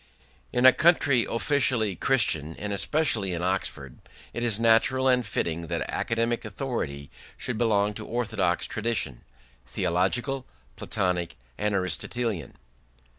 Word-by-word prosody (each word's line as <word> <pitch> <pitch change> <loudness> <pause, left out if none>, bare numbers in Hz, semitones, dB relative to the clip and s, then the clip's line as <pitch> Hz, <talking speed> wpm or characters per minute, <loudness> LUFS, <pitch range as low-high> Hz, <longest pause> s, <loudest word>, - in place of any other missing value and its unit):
In 125 +1 +1
a 130 - +10
country 140 -7 +3
officially 120 -5 +1
Christian, 80 - +1
and 105 0 -4
especially 110 - +1
in 85 0 -3
Oxford, 85 -8 -2 0.3
it 120 - -4
is 115 -3 +1
natural 115 +3 +3
and 125 -1 +3
fitting 85 -6 -3
that - - -2
academic 115 +1 -1
authority 95 - -4 0.3
should 125 -3 -3
belong 105 -3 +2
to 110 +1 -7
orthodox 110 -7 0
tradition 105 - -2 0.5
theological, 105 - -1 0.3
Platonic, 90 -2 -2 0.2
and 105 +4 -1
Aristotelian. 95 - -2
110 Hz, 120 wpm, -26 LUFS, 90-125 Hz, 0.5 s, a